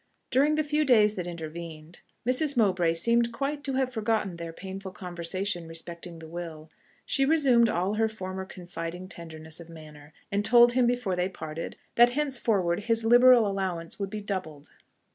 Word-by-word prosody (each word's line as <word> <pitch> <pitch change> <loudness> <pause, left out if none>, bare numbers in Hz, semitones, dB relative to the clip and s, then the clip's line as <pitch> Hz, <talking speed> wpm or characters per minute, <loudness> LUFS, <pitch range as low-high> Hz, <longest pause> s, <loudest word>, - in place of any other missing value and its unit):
During 290 +4 +3
the 310 - +1
few 300 +1 +1
days 215 -7 +5
that 180 -4 -5
intervened, 165 -1 -8 0.3
Mrs. 275 +2 +1
Mowbray 180 -7 +3
seemed 235 +6 +2
quite 280 +4 -3
to 270 - -1
have 260 -1 0
forgotten 215 -5 -1
their 170 -1 -6
painful 190 +2 -7
conversation 180 0 -3
respecting 170 +1 -6
the 160 0 -10
will; 160 -2 -8 0.3
she 275 - +2
resumed 270 -6 +4
all 185 +1 0
her 220 +1 +2
former 190 -3 -6
confiding 175 -1 -7
tenderness 160 -2 -7
of 170 -1 -12
manner, 155 -2 -13 0.2
and 200 +1 0
told 240 +2 +6
him 245 0 +3
before 245 -6 0
they 180 +1 0
parted, 160 -3 -6 0.2
that 240 +1 +6
henceforward 225 -10 0
his 230 -1 +1
liberal 245 0 +7
allowance 190 -4 -3
would 200 -1 -2
be 210 +1 -5
doubled. 180 -8 -5
195 Hz, 165 wpm, -27 LUFS, 170-235 Hz, 0.3 s, liberal